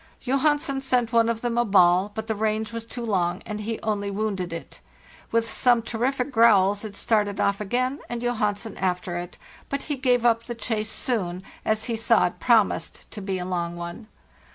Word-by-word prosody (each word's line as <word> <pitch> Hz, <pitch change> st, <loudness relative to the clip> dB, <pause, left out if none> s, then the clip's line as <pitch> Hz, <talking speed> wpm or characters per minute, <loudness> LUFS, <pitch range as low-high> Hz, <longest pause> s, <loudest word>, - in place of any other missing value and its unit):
"Johansen 275 Hz, +1 st, +1 dB
sent 250 Hz, -3 st, 0 dB
one 230 Hz, 0 st, +4 dB
of 230 Hz, -1 st, -2 dB
them 240 Hz, -1 st, 0 dB
a -, -, +4 dB
ball, 190 Hz, -2 st, +4 dB
but 220 Hz, -, -3 dB
the 220 Hz, -, -1 dB
range 215 Hz, +1 st, -1 dB
was 230 Hz, 0 st, -5 dB
too 240 Hz, 0 st, -5 dB
long, 180 Hz, -3 st, 0 dB
and 210 Hz, -1 st, -5 dB
he 220 Hz, +1 st, -3 dB
only 205 Hz, -2 st, -1 dB
wounded 200 Hz, -3 st, -2 dB
it. 165 Hz, -, -8 dB, 0.5 s
With 230 Hz, 0 st, +2 dB
some 240 Hz, -2 st, +3 dB
terrific 250 Hz, +4 st, -1 dB
growls 205 Hz, -4 st, +4 dB
it 210 Hz, -2 st, -7 dB
started 210 Hz, -2 st, +1 dB
off 200 Hz, +1 st, +1 dB
again, 255 Hz, +6 st, -1 dB
and 240 Hz, 0 st, -4 dB
Johansen 215 Hz, -3 st, -1 dB
after 180 Hz, -1 st, -1 dB
it; 175 Hz, 0 st, -7 dB, 0.3 s
but 280 Hz, 0 st, -2 dB
he 295 Hz, -, -2 dB
gave 250 Hz, -3 st, +2 dB
up 230 Hz, -1 st, +3 dB
the 240 Hz, -, -5 dB
chase 220 Hz, -1 st, -2 dB
soon, 190 Hz, -6 st, -2 dB, 0.2 s
as 215 Hz, 0 st, 0 dB
he 235 Hz, -1 st, -2 dB
saw 225 Hz, -3 st, +3 dB
it 175 Hz, -, -3 dB
promised 220 Hz, -8 st, +1 dB
to 210 Hz, -, -7 dB
be 190 Hz, -1 st, -2 dB
a 180 Hz, -, -4 dB
long 175 Hz, -2 st, -2 dB
one. 175 Hz, +6 st, -7 dB
220 Hz, 195 wpm, -25 LUFS, 195-240 Hz, 0.5 s, one